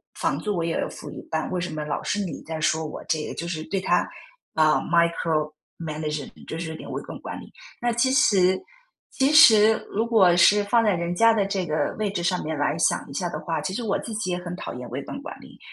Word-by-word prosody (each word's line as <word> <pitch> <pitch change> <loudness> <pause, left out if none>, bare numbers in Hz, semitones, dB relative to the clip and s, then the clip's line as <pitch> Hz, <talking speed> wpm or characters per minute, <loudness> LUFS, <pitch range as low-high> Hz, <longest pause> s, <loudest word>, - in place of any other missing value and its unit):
房 - - -1
租 210 -2 -2
我 170 - -1
也 165 - -1
要 - - -1
付 - - -9
一 - - -8
半， 160 0 -1
为 180 -1 -1
什 175 -3 -4
么 150 -1 -4
老 150 - -3
是 205 - -1
你 165 - -6
在 160 0 -5
说 160 +1 +1
我？ 150 - -7
这 155 -1 0
个 - - -6
就 170 - -5
是 160 -3 -4
对 190 +5 -2
他， 185 - +1 0.5
啊 155 -1 +4
micromanage， 155 -2 -1 0.2
就 160 - -5
是 165 -1 -4
有 160 - -6
点 - - -9
微 - - -3
观 - - -8
管 - - -7
理。 - - -13 0.3
那 240 0 +1
其 235 +3 +2
实 190 -8 +4 0.5
其 270 +2 +2
实 220 -8 +8 0.2
如 220 +3 -1
果 190 -7 +5
是 205 +4 +5
放 230 +3 +3
在 210 -2 +3
人 170 0 -2
家 230 +4 +5
的 205 -3 +1
这 195 -2 -2
个 155 -1 -1
位 210 - 0
置 180 -3 -3
上 180 +1 0
面 155 0 -3
来 145 +2 0
想 - - +1
一 - - -9
下 180 - -2
的 155 - -5
话， 165 +1 -3
其 185 - -4
实 240 - -3
我 210 -3 0
自 225 - -7
己 185 -4 -2
也 175 - -1
很 180 0 -6
讨 - - -6
厌 125 0 -8
微 - - -4
观 - - -7
管 - - -8
理。 - - -15
175 Hz, 310 characters per minute, -24 LUFS, 160-205 Hz, 0.5 s, 实